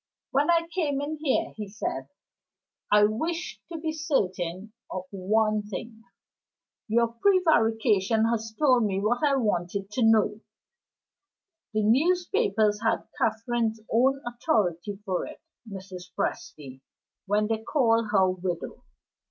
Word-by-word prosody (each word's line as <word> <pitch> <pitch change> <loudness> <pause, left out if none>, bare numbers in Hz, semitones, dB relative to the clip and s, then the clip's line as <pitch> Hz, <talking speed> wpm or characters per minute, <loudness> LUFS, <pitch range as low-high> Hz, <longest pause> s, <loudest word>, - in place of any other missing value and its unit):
"When 280 +4 +2
I 335 -1 +4
came 295 -7 0
in 295 +2 -3
here," 275 - +1
he 210 -1 -5
said, 205 +3 -4 0.8
"I 210 0 +6
wished 320 +12 -1
to 335 - -4
be 315 0 -2
certain 205 - -2 0.2
of 185 - -4
one 215 +2 +1
thing. 220 +2 -8 0.8
Your 230 +1 +2
prevarication 230 - +2
has 225 -1 -2
told 255 -6 +4
me 195 -2 0
what 235 +7 0
I 285 -2 +4
wanted 200 -4 -1
to 250 - -2
know. 220 -2 +3 1.4
The 215 - +2
newspapers 305 - +2
had 225 0 +1 0.2
Catherine's 225 0 0
own 265 +4 +3
authority 205 - -1
for 185 -3 -2
it, - - -11 0.3
Mrs. 190 -2 -8
Presty, 135 -3 -4 0.5
when 210 +2 +2
they 220 0 -1
called 230 -2 +2
her 195 -2 +4
widow. 185 -2 -4
220 Hz, 125 wpm, -27 LUFS, 205-265 Hz, 1.4 s, I